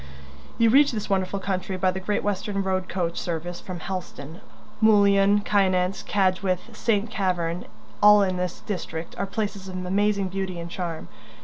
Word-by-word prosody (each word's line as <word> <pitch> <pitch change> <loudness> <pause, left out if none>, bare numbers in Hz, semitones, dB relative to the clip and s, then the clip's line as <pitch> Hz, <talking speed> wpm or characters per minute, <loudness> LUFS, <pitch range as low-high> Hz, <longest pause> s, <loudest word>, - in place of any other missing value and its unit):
You 230 -1 +4
reach 280 +1 +5
this 210 -2 -4
wonderful 190 0 0
country 190 -1 -3
by 185 0 +2
the 190 - -4
Great 205 +2 -1
Western 200 0 -1
road 185 -1 -1
coach 170 -2 -2
service 175 +1 -4
from 180 -2 -7
Helston. 170 -4 -6 0.4
Mullion, 205 -1 +5
Kynance, 190 -2 +1
Cadgwith, 190 +2 0
St. 215 -1 0
Keverne, 180 -3 -1 0.4
all 210 0 +8
in 185 -1 -1
this 180 -1 -3
district, 170 -4 -5
are 200 - -1
places 200 -1 -4
of 185 - -7
amazing 200 +1 +1
beauty 190 -2 -4
and 170 0 -7
charm. 170 - -5
190 Hz, 155 wpm, -25 LUFS, 180-205 Hz, 0.4 s, all